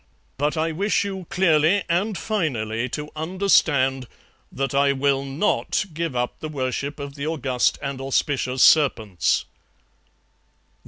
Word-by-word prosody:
But 150 Hz, +3 st, 0 dB
I 160 Hz, +1 st, 0 dB
wish 200 Hz, +7 st, 0 dB
you 190 Hz, -3 st, -6 dB
clearly 180 Hz, 0 st, +3 dB
and 185 Hz, +4 st, 0 dB
finally 125 Hz, -, -2 dB
to 150 Hz, +3 st, -6 dB
understand 155 Hz, -7 st, +2 dB, 0.4 s
that 135 Hz, +1 st, -3 dB
I 140 Hz, 0 st, +3 dB
will 135 Hz, 0 st, +1 dB
NOT 140 Hz, +9 st, 0 dB
give 165 Hz, -3 st, -3 dB
up 125 Hz, 0 st, -2 dB
the 155 Hz, -, -5 dB
worship 140 Hz, +1 st, -3 dB
of 140 Hz, -1 st, -6 dB
the 140 Hz, +1 st, -5 dB
august 135 Hz, -6 st, 0 dB
and 140 Hz, -1 st, -4 dB
auspicious 135 Hz, -1 st, 0 dB
serpents.' 110 Hz, -, +3 dB
145 Hz, 125 wpm, -23 LUFS, 135-165 Hz, 0.4 s, clearly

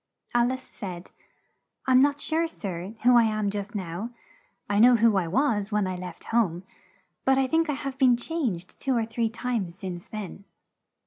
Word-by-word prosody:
Al 240 Hz, +1 st, +3 dB
ice 260 Hz, 0 st, -5 dB
said, 185 Hz, -8 st, -8 dB, 0.7 s
"I'm 255 Hz, -1 st, +5 dB
not 285 Hz, +1 st, +3 dB
sure, 325 Hz, +2 st, 0 dB
sir, 195 Hz, -, -6 dB
who 245 Hz, +1 st, +6 dB
I 235 Hz, -1 st, +6 dB
am 215 Hz, -2 st, 0 dB
just 205 Hz, +2 st, -5 dB
now 185 Hz, +3 st, -4 dB, 0.6 s
I 205 Hz, 0 st, +1 dB
know 245 Hz, +2 st, +8 dB
who 230 Hz, -2 st, +4 dB
I 185 Hz, -3 st, +1 dB
was 220 Hz, -, +1 dB
when 210 Hz, -1 st, +1 dB
I 185 Hz, 0 st, -2 dB
left 180 Hz, -1 st, -8 dB
home, 185 Hz, -7 st, +2 dB, 0.6 s
but 265 Hz, 0 st, +3 dB
I 270 Hz, -, +3 dB
think 325 Hz, +4 st, +1 dB
I -, -, +2 dB
have 275 Hz, -1 st, -5 dB
been 250 Hz, -3 st, +5 dB
changed 240 Hz, -, -3 dB
two 265 Hz, -3 st, +1 dB
or 225 Hz, -, +1 dB
three 225 Hz, 0 st, -1 dB
times 225 Hz, -7 st, -3 dB
since 180 Hz, -3 st, -6 dB
then." 200 Hz, -2 st, -7 dB
225 Hz, 185 wpm, -26 LUFS, 195-260 Hz, 0.7 s, know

